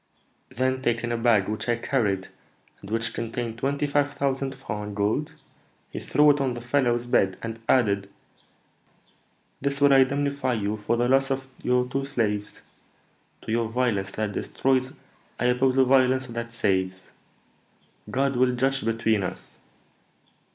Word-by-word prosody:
Then 130 Hz, +1 st, -1 dB
taking 120 Hz, -1 st, 0 dB
a -, -, +1 dB
bag 115 Hz, -5 st, +3 dB
which 110 Hz, +3 st, -3 dB
I 120 Hz, -, +3 dB
carried, 105 Hz, -7 st, -1 dB, 0.5 s
and 100 Hz, -, -11 dB
which 115 Hz, +1 st, -1 dB
contained 115 Hz, 0 st, -4 dB
twenty 140 Hz, +3 st, 0 dB
five 145 Hz, 0 st, +1 dB
thousand 135 Hz, -1 st, -1 dB
francs 105 Hz, -6 st, -5 dB
in 105 Hz, -, -6 dB
gold, 110 Hz, +10 st, -1 dB, 0.6 s
he -, -, -5 dB
threw 150 Hz, 0 st, +4 dB
it 145 Hz, 0 st, 0 dB
on 130 Hz, -3 st, 0 dB
the -, -, -5 dB
fellow's 120 Hz, -1 st, +1 dB
bed, 95 Hz, -6 st, +2 dB
and 115 Hz, 0 st, -5 dB
added, 100 Hz, -6 st, +2 dB, 1.5 s
'This 140 Hz, 0 st, -1 dB
will 140 Hz, 0 st, +5 dB
indemnify 140 Hz, 0 st, +2 dB
you 105 Hz, -1 st, -1 dB
for 110 Hz, +3 st, -1 dB
the 120 Hz, +1 st, +2 dB
loss 135 Hz, +1 st, +3 dB
of 135 Hz, 0 st, -2 dB
your 125 Hz, 0 st, +1 dB
two 135 Hz, +2 st, -2 dB
slaves, 105 Hz, -7 st, -2 dB, 0.8 s
to -, -, -5 dB
your 115 Hz, -1 st, 0 dB
violence 115 Hz, -5 st, 0 dB
that 105 Hz, -1 st, -3 dB
destroys 130 Hz, +4 st, 0 dB, 0.5 s
I 125 Hz, -, 0 dB
oppose 130 Hz, +1 st, +2 dB
a 130 Hz, -, +6 dB
violence 130 Hz, 0 st, +3 dB
that 115 Hz, -1 st, -6 dB
saves. 95 Hz, -4 st, -1 dB, 1.0 s
God 135 Hz, 0 st, 0 dB
will 125 Hz, 0 st, +3 dB
judge 135 Hz, +2 st, 0 dB
between 115 Hz, -2 st, +1 dB
us.' 90 Hz, -, -7 dB
125 Hz, 150 wpm, -25 LUFS, 110-135 Hz, 1.5 s, a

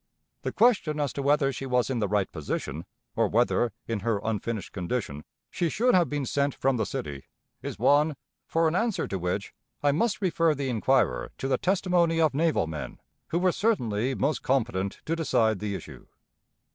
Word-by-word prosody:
The -, -, -3 dB
question 205 Hz, -10 st, +3 dB
as 145 Hz, -2 st, -1 dB
to 140 Hz, -, -3 dB
whether 140 Hz, 0 st, +2 dB
she 135 Hz, -, -5 dB
was 125 Hz, 0 st, +1 dB
in 125 Hz, -, -1 dB
the 105 Hz, -, +1 dB
right 105 Hz, -1 st, 0 dB
position, 75 Hz, 0 st, -4 dB, 0.3 s
or -, -, +3 dB
whether, 120 Hz, 0 st, +2 dB, 0.2 s
in 115 Hz, -2 st, -1 dB
her 110 Hz, 0 st, 0 dB
unfinished 110 Hz, 0 st, -3 dB
condition, 90 Hz, -, -3 dB, 0.3 s
she 170 Hz, -, 0 dB
should 245 Hz, +9 st, +2 dB
have 175 Hz, -2 st, +4 dB
been 145 Hz, -2 st, -2 dB
sent 140 Hz, +2 st, 0 dB
from 135 Hz, -1 st, +1 dB
the 110 Hz, -, 0 dB
city, 70 Hz, -2 st, -5 dB, 0.4 s
is -, -, -5 dB
one, 145 Hz, +6 st, +3 dB, 0.3 s
for 165 Hz, 0 st, +2 dB
an 160 Hz, -, 0 dB
answer 225 Hz, +1 st, 0 dB
to 95 Hz, -, -3 dB
which 90 Hz, +3 st, -2 dB, 0.3 s
I 145 Hz, -, +4 dB
must 210 Hz, +9 st, +1 dB
refer 165 Hz, -5 st, +2 dB
the 135 Hz, -1 st, -2 dB
inquirer 90 Hz, -, +1 dB
to 135 Hz, -, -3 dB
the 130 Hz, -2 st, +1 dB
testimony 180 Hz, -3 st, +2 dB
of 155 Hz, -3 st, +3 dB
naval 160 Hz, -, +2 dB
men, 80 Hz, -1 st, -6 dB, 0.3 s
who 170 Hz, -, -1 dB
were 180 Hz, +1 st, +3 dB
certainly 130 Hz, -, 0 dB
most 140 Hz, +3 st, 0 dB
competent 115 Hz, -7 st, -1 dB
to 165 Hz, -, 0 dB
decide 110 Hz, -, +1 dB
the 105 Hz, -1 st, -3 dB
issue. -, -, -10 dB
135 Hz, 185 wpm, -27 LUFS, 105-165 Hz, 0.4 s, have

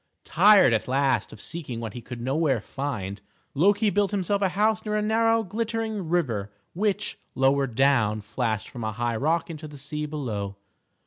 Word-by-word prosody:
Tired 190 Hz, -, +6 dB
at 110 Hz, -, 0 dB
last 135 Hz, 0 st, +1 dB
of 110 Hz, -, -12 dB
seeking 145 Hz, -7 st, -6 dB
what 115 Hz, -3 st, -5 dB
he 120 Hz, -, -7 dB
could 120 Hz, +1 st, -8 dB
nowhere 135 Hz, 0 st, +1 dB
find, 105 Hz, -6 st, -5 dB, 0.3 s
Loki 205 Hz, +7 st, +3 dB
built 205 Hz, -1 st, +2 dB
himself 200 Hz, 0 st, 0 dB
a 195 Hz, -, +3 dB
house 215 Hz, +4 st, +1 dB
near 210 Hz, -1 st, -2 dB
a 210 Hz, -, +1 dB
narrow, 225 Hz, +1 st, +3 dB
glittering 220 Hz, -2 st, -3 dB
river 115 Hz, -, 0 dB, 0.2 s
which, 200 Hz, +2 st, -1 dB, 0.2 s
lower 135 Hz, +1 st, +3 dB
down 115 Hz, -4 st, +2 dB
flashed 110 Hz, 0 st, -2 dB
from 120 Hz, -, -7 dB
a 110 Hz, 0 st, -2 dB
high 120 Hz, +1 st, -1 dB
rock 160 Hz, +7 st, 0 dB
into 155 Hz, -1 st, -7 dB
the 145 Hz, -1 st, -11 dB
sea 150 Hz, +2 st, -4 dB
below. 110 Hz, -10 st, -4 dB
145 Hz, 175 wpm, -26 LUFS, -, 0.3 s, Tired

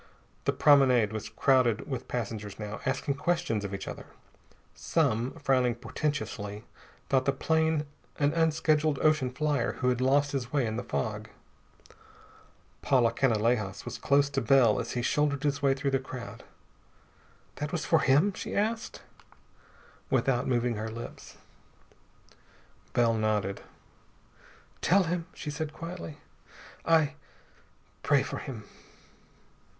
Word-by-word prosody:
The -, -, +3 dB
promenade 130 Hz, -7 st, +4 dB
was 110 Hz, -1 st, -5 dB
crowded 120 Hz, 0 st, +2 dB
with 130 Hz, -5 st, -5 dB
passengers 105 Hz, -4 st, -4 dB
now, 105 Hz, 0 st, -6 dB
asking 140 Hz, +1 st, -1 dB
questions 130 Hz, -11 st, 0 dB
of 100 Hz, -, -4 dB
each 100 Hz, 0 st, -5 dB
other. -, -, -7 dB, 0.7 s
Some, 130 Hz, -6 st, 0 dB
frowning 125 Hz, -3 st, +1 dB
portentously, 120 Hz, -5 st, -4 dB, 0.4 s
thought 130 Hz, -1 st, +2 dB
the 140 Hz, -, +3 dB
plane 160 Hz, +2 st, +1 dB, 0.3 s
an 145 Hz, 0 st, +2 dB
unscheduled 155 Hz, -2 st, +2 dB
ocean 155 Hz, -4 st, +3 dB
flier 140 Hz, -1 st, 0 dB
who 125 Hz, -, 0 dB
had 125 Hz, 0 st, 0 dB
lost 140 Hz, +2 st, +3 dB
his 130 Hz, -3 st, -3 dB
way 140 Hz, -4 st, +1 dB
in 110 Hz, -1 st, -2 dB
the 120 Hz, -, -3 dB
fog. 110 Hz, -2 st, -3 dB, 1.5 s
Paula 120 Hz, -4 st, +3 dB
Canalejas 115 Hz, -5 st, +1 dB
was -, -, -6 dB
close 140 Hz, 0 st, +3 dB
to 135 Hz, -1 st, 0 dB
Bell 130 Hz, -6 st, +4 dB
as -, -, -4 dB
he 120 Hz, -, -2 dB
shouldered 145 Hz, +1 st, +1 dB
his 145 Hz, 0 st, 0 dB
way 135 Hz, -1 st, +3 dB
through 135 Hz, +1 st, -1 dB
the 135 Hz, -, +2 dB
crowd. 120 Hz, -4 st, -8 dB, 1.1 s
"That 150 Hz, 0 st, -3 dB
was 175 Hz, -, -2 dB
for 165 Hz, -, +4 dB
him?" 150 Hz, +9 st, +3 dB
she -, -, -6 dB
asked, 220 Hz, +2 st, -2 dB, 1.1 s
without 125 Hz, -2 st, +1 dB
moving 120 Hz, -2 st, 0 dB
her 110 Hz, +1 st, -4 dB
lips. 115 Hz, +2 st, -9 dB, 1.6 s
Bell 115 Hz, -1 st, +3 dB
nodded. 105 Hz, -3 st, -1 dB, 1.2 s
"Tell 195 Hz, +2 st, +4 dB
him," 170 Hz, -1 st, -2 dB
she 150 Hz, -, -5 dB
said 155 Hz, +1 st, -4 dB
quietly, 165 Hz, -2 st, -7 dB, 0.7 s
"I 160 Hz, -2 st, +3 dB, 0.9 s
pray -, -, +3 dB
for -, -, -5 dB
him." 115 Hz, -5 st, -7 dB
135 Hz, 130 wpm, -29 LUFS, 115-150 Hz, 1.6 s, promenade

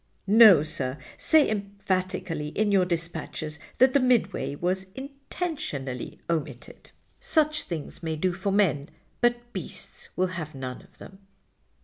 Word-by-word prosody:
"No, 205 Hz, -6 st, +8 dB
sir. 130 Hz, -3 st, -2 dB, 0.2 s
Say 315 Hz, -2 st, +5 dB
emphatically 190 Hz, -6 st, -2 dB
in 205 Hz, +7 st, 0 dB
your 190 Hz, -2 st, +4 dB
dispatches 165 Hz, -3 st, -3 dB, 0.2 s
that 260 Hz, 0 st, +5 dB
the 280 Hz, -, +5 dB
Midway 250 Hz, -, +1 dB
was 185 Hz, +4 st, -1 dB
intentionally 270 Hz, -, -5 dB
omitted. 165 Hz, -3 st, -4 dB, 0.3 s
Such 305 Hz, -1 st, +1 dB
things 160 Hz, -4 st, -6 dB
may 160 Hz, -1 st, -2 dB
do 180 Hz, +3 st, 0 dB
for 190 Hz, +2 st, -2 dB
men, 180 Hz, -8 st, +1 dB, 0.3 s
but 240 Hz, 0 st, 0 dB
beasts -, -, -8 dB
will 185 Hz, -, +2 dB
have 155 Hz, -4 st, -6 dB
none 130 Hz, +1 st, -6 dB
of 185 Hz, -1 st, -22 dB
them." 190 Hz, 0 st, -13 dB
185 Hz, 130 wpm, -26 LUFS, 155-230 Hz, 0.3 s, No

